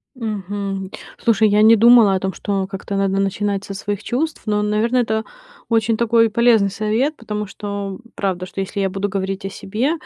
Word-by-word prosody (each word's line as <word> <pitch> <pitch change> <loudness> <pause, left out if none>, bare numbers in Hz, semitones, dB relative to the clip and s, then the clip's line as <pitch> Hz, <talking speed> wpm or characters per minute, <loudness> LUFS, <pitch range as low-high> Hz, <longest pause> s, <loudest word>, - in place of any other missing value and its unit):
Мгм. 200 -4 -4 0.3
Слушай, 220 -1 +4
я 205 +1 +3
не 220 +1 +7
думала 230 -3 +6
о - - 0
том, 190 0 -3
что 195 +1 -2
как-то 195 +1 -6
надо 195 0 +1
начинать 200 0 -1
со 200 - -7
своих 205 +1 -4
чувств, 305 +8 -2
но, 210 -1 +1
наверно, 215 +4 +1
это 220 -3 +1 0.5
очень 225 -1 +2
такой 230 0 +3
полезный 225 -3 +3
совет, 220 +9 0
потому 210 -4 -4
что, 200 -1 -6 0.2
правда, 185 -2 -2
что, 195 - -8
если 195 +1 -3
я 195 -1 +1
буду 195 +1 -2
говорить 195 0 -3
о - - -2
себе, 215 +8 -2
205 Hz, 185 wpm, -20 LUFS, 195-225 Hz, 0.5 s, не